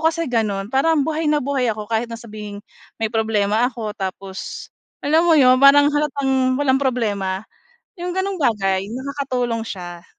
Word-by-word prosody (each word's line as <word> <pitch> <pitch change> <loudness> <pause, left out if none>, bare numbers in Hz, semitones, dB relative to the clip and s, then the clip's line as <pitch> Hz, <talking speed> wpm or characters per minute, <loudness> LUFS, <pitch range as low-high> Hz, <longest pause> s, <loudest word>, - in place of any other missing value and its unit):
kasi 335 +1 -2
gano'n. 210 -3 -1
Parang 285 +2 +3
buhay 315 -1 -1
na 300 -1 +2
buhay 270 -3 0
ako 215 -1 -2
kahit 225 +1 0
na 230 - -6
sabihing 210 -2 -8 0.4
may 220 0 -1
problema 220 +1 +1
ako 220 -4 -5
tapos 190 0 -6 0.3
alam 320 +4 +3
mo 325 - +6
'yon 255 -3 +5
parang 285 +1 +7
halatang 270 -3 +1
walang 270 -1 +2
problema. 205 -7 -1 0.5
'Yong 355 0 -4
gano'ng 380 +1 -2
bagay 195 - +1
nakakatulong 255 -4 -3
siya. 175 -3 -8
250 Hz, 155 wpm, -20 LUFS, 210-285 Hz, 0.5 s, parang